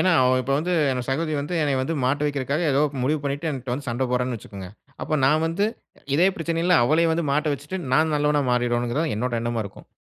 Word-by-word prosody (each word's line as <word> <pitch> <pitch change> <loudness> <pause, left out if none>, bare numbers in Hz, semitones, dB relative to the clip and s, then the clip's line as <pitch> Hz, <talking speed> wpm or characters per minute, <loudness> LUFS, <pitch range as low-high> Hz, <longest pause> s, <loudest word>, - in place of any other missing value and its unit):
ஏன்னா, 185 -1 +3
அவ 130 - +4
இப்ப 135 - -2
வந்து 175 +4 -1 0.2
என் 125 -1 -2
சகோதரி 155 +3 -1
வந்து 150 +5 -4
என்னைய 140 -3 +1
வந்து 150 +5 -2
மாட்ட 140 +3 +1
வைக்கிறக்காக 145 +2 -1
ஏதோ 140 +2 +3 0.2
முடிவு 150 +4 +1
பண்ணிட்டு 140 +3 -2
என்ட்ட 130 -3 -4
வந்து 140 +3 -4
சண்ட 120 +3 -1
போட்றான்னு 125 -1 0
வச்சிக்கங்க, 100 -3 -9 0.3
அப்ப 155 - 0
நான் 155 +3 +3
வந்து 180 +6 0 0.5
இதே 180 +5 +5
பிரச்சனையில 165 +1 +2
அவளே 160 +6 +3
வந்து 165 0 0
மாட்ட 150 +1 +1
வச்சுட்டு, 145 +7 -6 0.2
நான் 155 +2 +3
நல்லவனா 150 0 +2
மாறிரணுங்கிறதுதான் 120 +4 0
என்னோட 120 +2 -2
எண்ணமா 120 -1 -1
இருக்கும். 100 - -11
145 Hz, 205 wpm, -23 LUFS, 125-160 Hz, 0.5 s, இதே